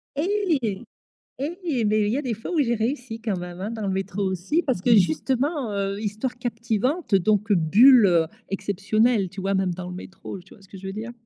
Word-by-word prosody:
Et 305 - 0 0.5
et 310 - -2
mais 215 +1 +2
il - - 0
y 260 - 0
a - - -1
des 245 -6 -2
fois 225 - -7
où 320 - +1
j'ai 235 -3 +1
réussi 230 0 -3
quand 215 -5 -2
même, 175 0 -7
hein, 205 +4 -4
dans 220 -3 -4
le - - 0
métro 195 +1 -3
aussi 190 - 0
parce 260 - -1
que, 235 +3 +4
justement, 245 - +1
heu, 200 0 -2
histoire 220 +4 -3
captivante, 235 - -1
donc 210 +3 +2
bulle, 210 - +6
heu, 170 -3 +3 0.2
exceptionnelle, 205 +1 +1
tu 190 +1 -8
vois. 195 +1 0
Même 190 -2 0
dans 180 0 -7
le 180 - -7
métro, 190 +1 -8
tu 185 - -17
vois, 200 - -19
ce 195 - -18
que 195 - -10
je 190 - -11
veux 195 - -5
dire? 225 +3 -6
215 Hz, 220 wpm, -24 LUFS, 195-250 Hz, 0.5 s, bulle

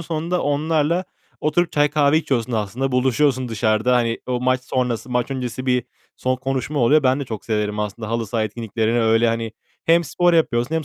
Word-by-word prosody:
sonunda 170 +2 -2
onlarla 155 +4 +1 0.4
oturup 165 +3 +1
çay 145 0 +3
kahve 150 0 +3
içiyorsun 125 -6 -1
aslında. 115 +5 -2
Buluşuyorsun 130 0 +2
dışarıda. 110 +2 +1
Hani, 115 -1 0
o 125 -1 -1
maç 130 0 +1
sonrası, 125 -2 -2
maç 125 +2 0
öncesi 130 -1 -4
bir 125 -2 +1 0.3
son 130 0 -1
konuşma 135 +3 -3
oluyor. 140 +5 +4
Ben 130 +1 +2
de - - -3
çok 110 -5 -7
severim 105 -1 -1
aslında 105 +1 -4
halı 115 0 -1
saha 110 +1 -1
etkinliklerini, 115 +1 -1
öyle 115 +1 +3
hani 115 -1 -2 0.3
hem 170 +1 +4
spor 175 +4 +2
yapıyorsun 145 -4 +1
hem 160 -1 -1
125 Hz, 185 wpm, -21 LUFS, 115-145 Hz, 0.4 s, oluyor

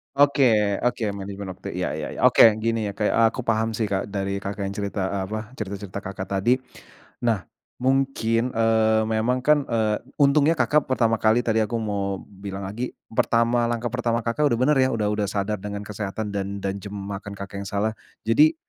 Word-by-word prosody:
Oke 125 -8 +4
oke 125 -1 0
manajemen 100 -1 -6
waktu 90 - -8
iya - - -1
iya - - -4
iya, - - -8
oke - - +5 0.2
gini 115 -2 0
ya, 100 - -5 0.3
aku 125 +2 -3
paham 110 -1 0
sih, 110 - -1
Kak, 100 -2 -1
dari, 100 -1 -2
Kakak, 100 +1 -4
yang 95 - -2
cerita, 100 0 -2
eee, 100 -1 -1
apa 110 +2 -5
cerita-cerita, 100 -1 -5
Kakak, 95 -1 -6
tadi. 100 +6 +3 0.7
Nah, 110 -6 +1 0.4
mungkin, 130 -4 +2
eee, 110 -1 +3
memang 120 +4 +1
kan, 150 0 +4
eee, 110 -2 +1 0.2
untungnya, 145 +2 +4
Kakak, 150 -2 +2
pertama 115 -4 +2
kali 110 +2 +3
tadi 110 -1 +1
aku 110 +2 0
mau 100 -3 -2
bilang 100 0 -8
lagi, 110 +6 -5 0.2
pertama 115 +1 +2
langkah 120 0 -2
pertama, 115 -2 0
Kakak, 135 +6 +1
udah 120 - +2
bener 145 +2 +4
ya. 130 0 +4
Udah 105 -2 0
udah 105 -1 0
sadar 100 +1 -2
dengan 100 +1 -5
kesehatan 105 +1 -4
dan 100 0 -4
dan 100 0 -2
jam 100 +1 -8
makan, 100 +1 -6
Kakak, 100 0 -7
yang 100 - -5
salah. 100 +3 0 0.3
Jadi 150 +8 +4
110 Hz, 185 wpm, -24 LUFS, 100-120 Hz, 0.7 s, oke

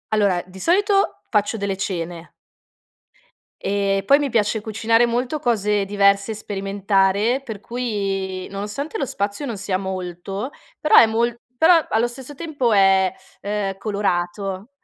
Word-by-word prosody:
Allora, 200 -4 +2
di 185 +1 -13
solito 395 - +2
faccio 210 +1 +1
delle 200 -2 -2
cene 175 -3 -5 1.3
e 195 -1 +1
poi 280 - +7
mi 290 -1 -1
piace 220 -1 +1
cucinare 225 +2 +2
molto 245 +5 -1
cose 210 -6 +1
diverse 200 +1 +2
e - - -2
sperimentare, 200 +3 0
per 220 -5 -6
cui 195 -6 -3
nonostante 210 +10 -5
lo 275 - -1
spazio 205 +3 -3
non 235 -5 -4
sia 195 -1 -2
molto, 190 +3 -5 0.3
però 305 - +3
è - - +10
mol 230 +2 0 0.2
però 340 +2 +7 0.2
allo 225 +2 +2
stesso 260 +3 -9
tempo 285 -6 -1
è, 195 -2 +4 0.3
ehm, 200 -1 -2
colorato, 195 0 -2
205 Hz, 135 wpm, -21 LUFS, 195-235 Hz, 1.3 s, è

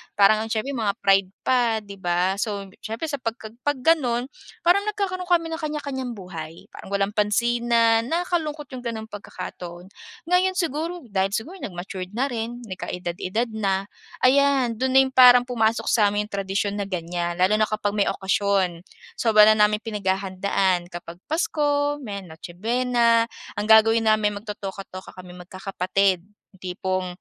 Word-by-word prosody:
parang 215 +2 +4
ang - - -8
siyempre 225 +6 -2
mga 210 -3 0
pride 195 -1 +3
pa, 235 -4 +2
'di 200 -1 -11
ba. 180 +2 0
So, 200 -2 -3 0.2
siyempre 225 +9 -4
sa 285 - -2
'pagka 230 -2 -5 0.2
'pag 290 - +2
gano'n 250 -6 +2 0.4
parang 370 +4 +4
nagkakaroon 390 -3 -2
kami 340 -2 +2
ng 320 - -3
kanya-kanyang 280 -5 -4
buhay, 170 -4 -9
parang 200 - -10
walang 200 0 +1
pansinan, 230 +1 +2
nakakalungkot 320 -2 -2
yung 255 -1 -8
gano'n 220 -1 -4
pagkakataon. 180 -3 -8 0.4
Ngayon 370 +1 +3
siguro 335 0 -2
dahil 195 0 0
siguro 325 +13 -5
nag-matured 185 0 -6
na 265 +5 0
rin 235 +1 -4
nagkaedad-edad 185 +5 -3
na, 195 -2 0 0.4
ayan 265 -3 +3
do'n 260 0 0
na - - +9
yung 265 - -3
parang 250 -1 +8
pumasok 230 -2 0
sa 215 -3 +4
amin 210 +1 -2
yung - - -20
tradisyon 195 +1 -1
na 200 - -2
ganyan 175 -1 -3
lalo 185 +4 +3
na 215 - +3
kapag 210 -1 -2
may 200 - +4
okasyon. 190 -3 0 0.4
Sobra 215 -2 +6
na 215 - +5
naming 210 +1 -1
pinaghahandaan 190 -3 0
kapag 175 -1 -8
Pasko, 290 -2 0
may 205 -6 -6
Noche 170 0 -11
buena. 235 +2 +2 0.3
Ang 205 - -1
gagawin 225 +1 +5
namin 210 -1 +2
magtotoka-toka 195 -3 -8
kaming 180 -1 -10
magkakapatid, 190 -1 0 0.3
yung 190 - -20
tipong 185 0 -2
215 Hz, 155 wpm, -24 LUFS, 190-250 Hz, 0.4 s, na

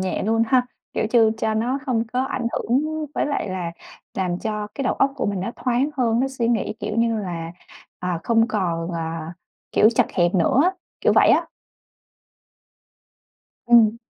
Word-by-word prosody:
nhẹ 185 -1 -2
luôn 225 +3 +2
ha. 250 +1 +3 0.3
Kiểu - - 0
như 225 -2 +5
cho 220 -1 0
nó 240 +5 0
hông 235 -3 +1
có 255 +1 +1
ảnh 255 -2 -3
hưởng 305 +5 -1
với - - 0
lại 285 -8 -2
là 180 -3 -3 0.4
làm 180 -2 -1
cho 210 0 -3
cái 275 - -3
đầu - - +1
óc 275 0 +2
của 260 - -1
mình 200 -2 -1
nó 195 - -3
thoáng 255 +3 0
hơn. 235 -3 +2
Nó 270 - +1
suy 245 -3 -2
nghĩ, 220 -2 0
kiểu 210 - -3
như 230 -1 +2
là, 170 -4 -5 0.5
ờ, 180 - -4 0.2
không 230 0 +3
còn, 175 -5 -1
à, 165 -1 -4 0.4
kiểu, 215 - +6
chật 230 - +2
hẹp 175 +1 +2
nữa 185 +9 +3
á, 360 - +4 0.3
kiểu - - +3
vậy - - +5
á. - - +4 2.2
Ừm. 230 -2 +6
225 Hz, 185 wpm, -22 LUFS, 185-250 Hz, 2.2 s, kiểu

